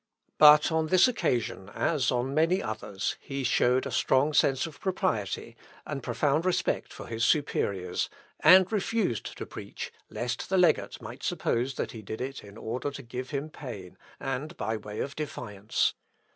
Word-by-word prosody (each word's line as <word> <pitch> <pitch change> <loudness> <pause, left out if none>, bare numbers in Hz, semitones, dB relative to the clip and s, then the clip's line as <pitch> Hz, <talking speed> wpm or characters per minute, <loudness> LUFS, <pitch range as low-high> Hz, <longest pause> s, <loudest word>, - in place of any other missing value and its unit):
But 150 +1 +8
on 160 0 +1
this 185 +7 +6
occasion, 120 - -1
as 140 -7 +1
on 125 +2 -1
many 165 +5 +3
others, 105 - -3
he 135 -1 -5
showed 125 +1 +3
a 135 - -4
strong 130 +5 +2
sense 135 -2 +3
of 160 -3 -9
propriety, 115 - -1 0.3
and 140 -2 -4
profound 145 +6 +1
respect 185 -1 0
for - - -9
his 115 -1 -3
superiors, 100 - +1 0.3
and 185 +4 +7
refused 205 - -1
to - - -5
preach, - - -7 0.2
lest 120 0 -3
the 190 - +2
legate 175 -3 +2
might - - -8
suppose 125 +3 -1
that - - -3
he 110 - -8
did 110 +2 -6
it 135 +2 -5
in 100 0 -12
order 120 +5 -3
to 140 -1 -8
give 125 +2 -6
him 145 +2 -3
pain, 100 -12 -8 0.2
and 140 +4 -4
by 110 - -1
way 105 0 -5
of 140 - -4
defiance. 105 -9 -1
135 Hz, 165 wpm, -28 LUFS, 115-155 Hz, 0.3 s, But